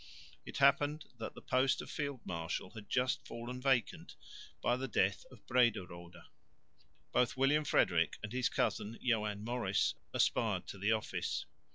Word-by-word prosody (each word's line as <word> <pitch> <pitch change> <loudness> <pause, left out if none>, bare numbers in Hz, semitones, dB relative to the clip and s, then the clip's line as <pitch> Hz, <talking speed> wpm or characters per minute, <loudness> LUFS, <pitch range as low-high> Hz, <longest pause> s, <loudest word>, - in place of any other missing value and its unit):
It - - -6
happened 145 +2 +3
that 110 - -5
the - - -11
post 130 +1 +2
of - - -6
field 140 -5 -3
marshal 85 +1 -3
had 105 -2 -11
just 125 0 +1
fallen 120 +2 -6
vacant 130 -4 0 0.4
by 120 - +2
the 130 +1 -3
death 100 -2 +1
of 125 -5 -17
Brederode. 90 -8 0 0.9
Both 125 +1 +2
William 145 +3 +3
Frederick 85 -9 +2
and 105 +2 -5
his 130 -1 +1
cousin 110 +3 -1
Joan 105 -4 0
Maurice 115 -4 +1 0.2
aspired - - +1
to 100 - -7
the 105 +3 +2
office. 110 -1 -1
120 Hz, 150 wpm, -35 LUFS, 100-130 Hz, 0.9 s, happened